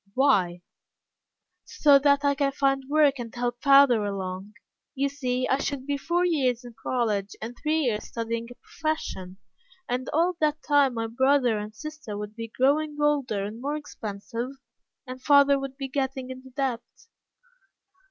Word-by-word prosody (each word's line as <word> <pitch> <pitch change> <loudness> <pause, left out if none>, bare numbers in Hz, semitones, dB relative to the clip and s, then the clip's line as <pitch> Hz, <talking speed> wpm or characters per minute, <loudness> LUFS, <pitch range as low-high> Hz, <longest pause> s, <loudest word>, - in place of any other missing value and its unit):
"Why?" 190 -11 +2 1.0
"So 285 -2 +4
that 280 0 +3
I 285 - +4
can 275 0 0
find 270 -1 0
work 290 -3 +3
and 230 -2 -7
help 240 0 -2
father 275 -5 +6
along. 195 0 -4 0.4
You 280 +1 0
see, 255 -3 -2
I 265 - +1
should 280 -2 -3
be 285 0 -1
four 345 +5 0
years 260 -8 +1
in 240 - -10
college, 215 -6 -1
and 230 +2 -6
three 310 +4 0
years 225 -7 -1
studying 230 0 -4
a 245 - -11
profession, 190 - -4 0.5
and 250 +1 -2
all 340 +4 +2
that 305 0 0
time 285 -4 +3
my 225 0 -1
brother 250 -1 +2
and 210 +1 -7
sister 305 -6 -7
would 210 +1 -7
be 230 0 -5
growing 295 +6 +1
older 275 -9 +1
and 215 +4 -6
more 290 +3 -2
expensive, 230 -3 -6 0.6
and 255 0 -8
father 280 0 +5
would 270 -1 -6
be 275 -2 -4
getting 265 -1 -3
into 260 0 -10
debt." 260 -3 -2
260 Hz, 160 wpm, -26 LUFS, 230-285 Hz, 1.0 s, father